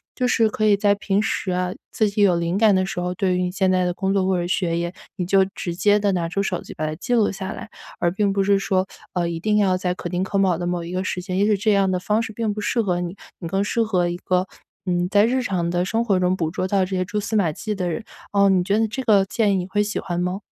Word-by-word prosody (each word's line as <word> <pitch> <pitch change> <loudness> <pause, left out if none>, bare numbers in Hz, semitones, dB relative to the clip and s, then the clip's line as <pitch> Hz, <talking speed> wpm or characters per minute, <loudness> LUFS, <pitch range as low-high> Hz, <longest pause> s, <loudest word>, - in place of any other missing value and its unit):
就 250 - 0
是 230 -2 +3
可 215 0 -3
以 210 -2 +5
在 205 0 +3
平 200 -1 0
时 190 - -2
啊， 180 0 -1 0.2
自 215 - +1
己 205 +1 -1
有 190 -4 +5
灵 170 +1 -1
感 210 -1 +4
的 185 0 +2
时 185 - -4
候， 180 0 -2
对 185 -1 +1
于 180 - 0
你 180 - 0
现 190 0 +1
在 185 -1 +2
的 180 - 0
工 190 +1 -1
作 190 -2 +1
或 185 -1 +1
者 175 - -2
学 175 -2 0
业， 170 +1 -2 0.2
你 180 - -2
就 195 +2 +4
直 175 -2 -4
接 205 +3 +3
地 205 -1 +1
拿 170 -3 -1
出 200 +3 -1
手 185 -2 -2
机 - - -11
把 155 - -3
它 155 - -2
记 245 +9 -1
录 220 -3 +3
下 190 0 -5
来。 225 - -7 0.3
而 175 - +1
并 200 +2 +1
不 195 0 +1
是 200 0 +3
说， 190 -1 0 0.3
呃， 175 -2 0
一 170 -1 -3
定 210 +4 +1
要 195 -3 +3
在 180 -1 -1
可 175 - -6
丁 180 0 -1
可 195 +1 -2
卯 190 -3 +3
的 175 +1 -3
某 175 -1 -2
一 170 - -7
个 185 +1 -2
时 185 - -2
间 185 0 -4
也 205 - +3
许 210 -2 +3
这 215 +2 +1
样 195 -1 +3
的 185 -1 0
方 210 +4 0
式 225 - -5
并 220 -1 -2
不 210 - -5
适 235 - 0
合 180 -3 0
你， 175 +2 -5 0.2
你 170 - -5
更 195 +4 0
适 230 +3 0
合 185 -6 +1
一 175 - -2
个 180 0 0 0.4
嗯， 175 -1 0
在 205 +2 +4
日 255 +3 +1
常 180 -8 -1
的 175 0 +1
生 225 +5 -1
活 195 -5 +2
中 180 0 +2
捕 160 -4 -2
捉 185 +2 -2
到 190 -1 +2
这 190 +1 -4
些 185 - +1
蛛 205 +3 -3
丝 210 +2 -3
马 190 -7 +2
迹 215 +7 -4
的 185 -3 -2
人。 170 +7 -3 0.3
呃， 200 -1 +4
你 185 -2 +3
觉 200 +3 +1
得 225 0 +2
这 240 +5 -4
个 210 -6 +4
建 210 +1 +1
议 - - +2
你 180 -1 -1
会 195 +2 0
喜 210 0 -2
欢 175 -2 -3
吗？ 180 +3 -2
190 Hz, 330 characters per minute, -22 LUFS, 180-205 Hz, 0.4 s, 以